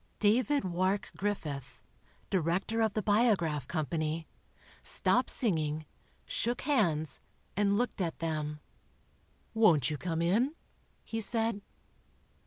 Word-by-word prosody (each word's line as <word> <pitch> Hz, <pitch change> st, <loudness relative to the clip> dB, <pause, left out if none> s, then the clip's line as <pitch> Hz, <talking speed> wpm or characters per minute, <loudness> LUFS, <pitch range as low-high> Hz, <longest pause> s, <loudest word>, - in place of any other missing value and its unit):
David 250 Hz, +6 st, +3 dB
Wark 185 Hz, +3 st, 0 dB
Griffith, 155 Hz, -10 st, -3 dB, 0.5 s
director 190 Hz, +5 st, +1 dB
of 220 Hz, -2 st, +1 dB
the 215 Hz, -, 0 dB
Biograph 195 Hz, -, +2 dB
Company, 155 Hz, 0 st, -2 dB, 0.6 s
stopped -, -, +3 dB
singing, 155 Hz, -, 0 dB, 0.4 s
shook 240 Hz, +2 st, -1 dB
hands 165 Hz, -, +1 dB, 0.4 s
and 200 Hz, 0 st, +2 dB
looked 245 Hz, -3 st, -1 dB
at 165 Hz, -3 st, -2 dB
them. 150 Hz, -2 st, -3 dB, 0.9 s
"Won't 170 Hz, -, +4 dB
you 150 Hz, -, -3 dB
come 165 Hz, +2 st, -1 dB
in?" 235 Hz, -, +2 dB, 0.5 s
he 225 Hz, 0 st, -4 dB
said. 225 Hz, -1 st, +2 dB
185 Hz, 105 wpm, -31 LUFS, 155-220 Hz, 0.9 s, Won't